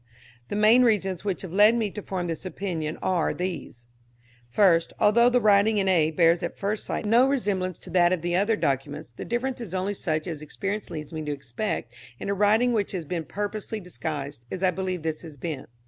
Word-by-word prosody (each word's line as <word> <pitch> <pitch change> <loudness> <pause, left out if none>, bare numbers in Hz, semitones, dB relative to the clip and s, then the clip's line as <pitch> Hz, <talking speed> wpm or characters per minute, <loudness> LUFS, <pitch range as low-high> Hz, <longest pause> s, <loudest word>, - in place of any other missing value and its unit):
The - - -4
main 215 +4 +6
reasons 195 -7 +1
which 195 -3 -2
have 180 -3 -7
led 210 +4 +6
me 220 -4 0
to 210 - -6
form 185 -2 -3
this 165 -1 -4
opinion 170 -4 -4
are 180 -3 +1
these: 175 -9 -5 0.6
First, 170 - +3
although 235 +3 +5
the 250 0 +3
writing 210 0 +4
in 195 -1 +1
A 165 -5 +4
bears 165 +1 +3
at - - -4
first 205 +2 -2
sight - - -3
no 235 +5 +5
resemblance 195 - -1
to - - -11
that 175 -1 +4
of 180 -3 -1
the 175 0 0
other 205 +4 +2
documents, 140 - -2
the 115 - -8
difference 245 +2 -2
is 190 -6 -6
only 190 +2 -1
such 155 -5 -2
as 160 -4 -5
experience 200 +7 -4
leads 155 0 -7
me 160 - -3
to 150 - -2
expect 135 - -4 0.2
in - - -5
a - - +2
writing 215 +5 +3
which 205 -3 0
has 175 -4 -3
been 165 +1 -3
purposely 210 +3 -4
disguised, 145 - -6
as 185 - -5
I 185 - +4
believe 185 -2 -3
this 160 -1 -2
has 155 -4 -10
been. 145 0 -5
185 Hz, 210 wpm, -26 LUFS, 160-210 Hz, 0.6 s, main